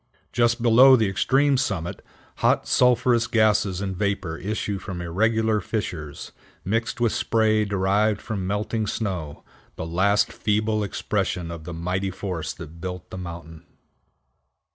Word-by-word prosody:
Just 120 Hz, 0 st, +2 dB
below 125 Hz, +3 st, +8 dB
the 110 Hz, -4 st, +2 dB
extreme 135 Hz, +8 st, +2 dB
summit 95 Hz, -9 st, -2 dB, 0.3 s
hot -, -, +2 dB
sulphurous 125 Hz, -1 st, +3 dB
gases 105 Hz, -4 st, +2 dB
and 95 Hz, -2 st, -3 dB
vapor 100 Hz, -4 st, -2 dB
issue 100 Hz, 0 st, -3 dB
from 95 Hz, -2 st, -6 dB
irregular 110 Hz, +5 st, +1 dB
fissures, 90 Hz, -9 st, -5 dB, 0.3 s
mixed 115 Hz, +5 st, -1 dB
with 120 Hz, -2 st, +2 dB
spray 110 Hz, -1 st, +2 dB
derived 100 Hz, +2 st, +1 dB
from 100 Hz, -4 st, -4 dB
melting 105 Hz, +2 st, -1 dB
snow, 90 Hz, -10 st, -4 dB, 0.3 s
the -, -, -5 dB
last 95 Hz, +5 st, +2 dB
feeble 110 Hz, 0 st, 0 dB
expression 90 Hz, -3 st, -2 dB
of 80 Hz, -2 st, -8 dB
the 85 Hz, -, -6 dB
mighty 90 Hz, +3 st, -2 dB
force 95 Hz, -3 st, -4 dB
that 85 Hz, -1 st, -11 dB
built 90 Hz, -1 st, -6 dB
the -, -, -6 dB
mountain. 85 Hz, -2 st, -8 dB
100 Hz, 135 wpm, -24 LUFS, 90-110 Hz, 0.3 s, below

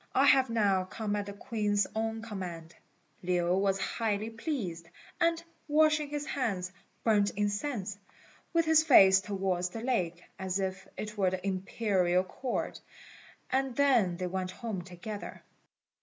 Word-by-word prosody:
I 270 Hz, -, +5 dB
have 265 Hz, -2 st, +5 dB
now 200 Hz, -5 st, +2 dB
come 210 Hz, +2 st, -3 dB
at 205 Hz, -1 st, -3 dB
the 200 Hz, -, -6 dB
Queen's 205 Hz, -2 st, 0 dB
own 225 Hz, 0 st, -2 dB
command." 175 Hz, -6 st, -6 dB, 0.5 s
Lin 180 Hz, 0 st, +1 dB
was 195 Hz, 0 st, +1 dB
highly 215 Hz, +1 st, -1 dB
pleased; 220 Hz, -, -4 dB, 0.3 s
and 335 Hz, -1 st, +2 dB, 0.2 s
washing 305 Hz, 0 st, +3 dB
his 295 Hz, 0 st, -3 dB
hands, 195 Hz, -11 st, -2 dB, 0.3 s
burnt 205 Hz, -3 st, +3 dB
incense, 205 Hz, -1 st, -2 dB, 0.5 s
with 335 Hz, -1 st, +2 dB
his 315 Hz, 0 st, +6 dB
face 195 Hz, -11 st, +7 dB
towards 190 Hz, -3 st, -1 dB
the 225 Hz, +5 st, -6 dB
lake, 180 Hz, -9 st, -1 dB, 0.2 s
as 190 Hz, 0 st, -1 dB
if 190 Hz, 0 st, -3 dB
it 210 Hz, 0 st, -6 dB
were 190 Hz, -2 st, +4 dB
the 185 Hz, 0 st, -4 dB
Imperial 185 Hz, -2 st, +1 dB
Court, 240 Hz, +7 st, -4 dB, 0.7 s
and 265 Hz, -1 st, 0 dB
then 240 Hz, -11 st, +3 dB
they 185 Hz, -, -3 dB
went 185 Hz, 0 st, -2 dB
home 215 Hz, -2 st, -5 dB
together. 185 Hz, +4 st, -8 dB
205 Hz, 140 wpm, -30 LUFS, 185-235 Hz, 0.7 s, face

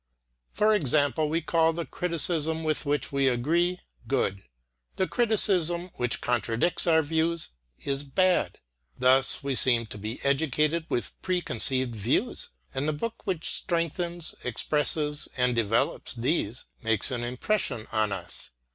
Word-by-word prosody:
For 215 Hz, +1 st, +3 dB
example, 150 Hz, -, +2 dB
we 165 Hz, +2 st, 0 dB
call 165 Hz, +1 st, +2 dB
the 170 Hz, 0 st, -4 dB
criticism 160 Hz, -2 st, -1 dB
with 155 Hz, -2 st, -1 dB
which 145 Hz, +1 st, -1 dB
we 140 Hz, -1 st, +2 dB
agree 170 Hz, +9 st, +1 dB, 0.3 s
good; 110 Hz, -7 st, 0 dB, 0.5 s
the 190 Hz, -, +1 dB
criticism 185 Hz, -7 st, +2 dB
which 120 Hz, -1 st, 0 dB
contradicts 120 Hz, +8 st, 0 dB
our 160 Hz, -1 st, +4 dB
views 160 Hz, +2 st, 0 dB, 0.3 s
is 140 Hz, 0 st, -1 dB
bad. 185 Hz, +6 st, +1 dB, 0.4 s
Thus 130 Hz, +3 st, +3 dB
we 140 Hz, -1 st, -1 dB
seem 120 Hz, -2 st, +4 dB
to 105 Hz, -1 st, -9 dB
be 110 Hz, +4 st, -5 dB
educated 150 Hz, +3 st, +1 dB
with 120 Hz, -, -3 dB
preconceived 130 Hz, -8 st, 0 dB
views, 105 Hz, -, -1 dB, 0.2 s
and 135 Hz, +3 st, -2 dB
the 155 Hz, -, +1 dB
book 220 Hz, +8 st, -5 dB
which 175 Hz, -4 st, -1 dB
strengthens, 170 Hz, 0 st, -2 dB
expresses 150 Hz, +4 st, +1 dB
and 125 Hz, -1 st, +2 dB
develops 115 Hz, +1 st, 0 dB
these 120 Hz, -2 st, -1 dB, 0.2 s
makes 115 Hz, -1 st, +1 dB
an 120 Hz, -2 st, -2 dB
impression 125 Hz, -, -1 dB
on 110 Hz, -2 st, +1 dB
us. 95 Hz, -3 st, -7 dB
150 Hz, 135 wpm, -27 LUFS, 125-170 Hz, 0.5 s, our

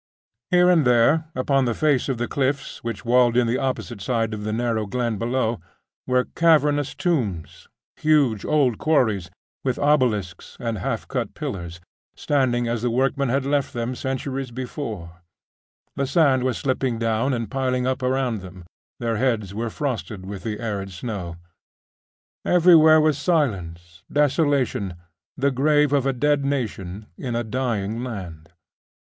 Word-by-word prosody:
Here 180 Hz, 0 st, +5 dB
and 175 Hz, -4 st, +5 dB
there, 125 Hz, +6 st, +4 dB
upon 135 Hz, +1 st, +2 dB
the 120 Hz, -2 st, 0 dB
face 145 Hz, -4 st, +1 dB
of 130 Hz, -, -1 dB
the 120 Hz, +1 st, -2 dB
cliffs 140 Hz, 0 st, -2 dB
which 115 Hz, 0 st, -5 dB
walled 120 Hz, 0 st, +4 dB
in 125 Hz, -, +4 dB
the 120 Hz, +2 st, 0 dB
opposite 125 Hz, -5 st, -3 dB
side 115 Hz, 0 st, -1 dB
of 105 Hz, -1 st, -5 dB
the 110 Hz, -, -2 dB
narrow 115 Hz, -1 st, -1 dB
glen 120 Hz, -2 st, -2 dB
below, 120 Hz, -1 st, 0 dB, 0.5 s
were 125 Hz, 0 st, +2 dB
cavernous 150 Hz, -4 st, +2 dB
tombs, 115 Hz, -, -2 dB, 0.3 s
huge 140 Hz, -9 st, +2 dB
old 135 Hz, -7 st, +2 dB
quarries, 110 Hz, -, +1 dB, 0.3 s
with 130 Hz, -2 st, -1 dB
obelisks 120 Hz, -, 0 dB
and 115 Hz, -3 st, -3 dB
half -, -, -3 dB
cut -, -, -3 dB
pillars, 85 Hz, -3 st, -5 dB, 0.4 s
standing 125 Hz, -4 st, +1 dB
as 115 Hz, -1 st, -1 dB
the 120 Hz, -, 0 dB
workmen 135 Hz, +2 st, +1 dB
had 135 Hz, +2 st, 0 dB
left 140 Hz, -1 st, 0 dB
them 120 Hz, 0 st, -2 dB
centuries 135 Hz, 0 st, -3 dB
before; 115 Hz, -, -6 dB, 0.7 s
the 140 Hz, -1 st, -1 dB
sand 140 Hz, -3 st, +3 dB
was 130 Hz, -3 st, 0 dB
slipping 130 Hz, -3 st, -1 dB
down 115 Hz, +3 st, 0 dB
and 115 Hz, -4 st, -3 dB
piling 130 Hz, -2 st, 0 dB
up 130 Hz, +1 st, -1 dB
around 125 Hz, -4 st, 0 dB
them, 90 Hz, -1 st, -11 dB, 0.3 s
their 115 Hz, -2 st, -1 dB
heads 110 Hz, -5 st, 0 dB
were 115 Hz, +3 st, -3 dB
frosted 110 Hz, -7 st, -4 dB
with 100 Hz, 0 st, -6 dB
the 105 Hz, -2 st, -4 dB
arid 100 Hz, -4 st, -4 dB
snow; 90 Hz, -3 st, -5 dB, 1.1 s
everywhere 165 Hz, -3 st, +6 dB
was 155 Hz, -2 st, +2 dB
silence, 90 Hz, -, -1 dB
desolation 140 Hz, -, +1 dB, 0.4 s
the 140 Hz, +1 st, +2 dB
grave 145 Hz, +2 st, +3 dB
of 135 Hz, -2 st, +2 dB
a -, -, +3 dB
dead 145 Hz, +2 st, +1 dB
nation, 110 Hz, -8 st, -3 dB
in 120 Hz, -3 st, -3 dB
a 120 Hz, -, 0 dB
dying 115 Hz, -2 st, -2 dB
land. 90 Hz, -10 st, -7 dB
125 Hz, 150 wpm, -23 LUFS, 110-140 Hz, 1.1 s, everywhere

